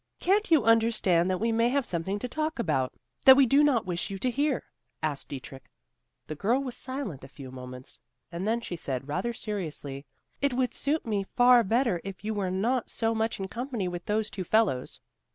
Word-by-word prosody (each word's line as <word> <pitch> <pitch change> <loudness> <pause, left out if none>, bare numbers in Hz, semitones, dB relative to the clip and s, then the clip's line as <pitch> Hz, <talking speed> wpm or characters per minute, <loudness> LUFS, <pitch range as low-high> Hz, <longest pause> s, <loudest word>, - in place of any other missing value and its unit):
"Can't 405 +3 +2
you 315 -7 +5
understand 220 -6 +3
that 185 - +1
we 230 +1 +1
may 230 +1 +3
have 275 0 +1
something 180 +4 -2
to 230 - -4
talk 310 +4 -2
about, 150 - 0 0.3
that 265 0 +10
we 275 - +7
do 275 +4 +5
not 270 -7 +3
wish 175 -1 -2
you 195 - -4
to 250 +6 0
hear?" 285 +1 0 0.4
asked 150 -3 -2
Dietrich. 135 -1 -9 0.6
The - - -5
girl 220 - +1
was 260 -3 -4
silent 260 - -5
a - - -9
few 135 -2 -11
moments, 125 0 -9 0.3
and 175 +4 -3
then 230 +2 +1
she 180 - -5
said, 135 -5 -4
rather 185 +10 -1
seriously, 155 -11 -5 0.3
"It 280 -3 +1
would 250 -2 0
suit 295 +2 -1
me 205 -3 -1
far 245 0 +7
better, 225 -4 +1
if 195 -1 -8
you 220 +1 -2
were 200 -3 -1
not 225 +7 0
so 225 0 0
much 225 -1 -1
in 195 - -3
company 235 -2 -3
with 175 0 -5
those 215 0 0
two 190 - -4
fellows. 190 - +1
215 Hz, 205 wpm, -28 LUFS, 175-245 Hz, 0.6 s, that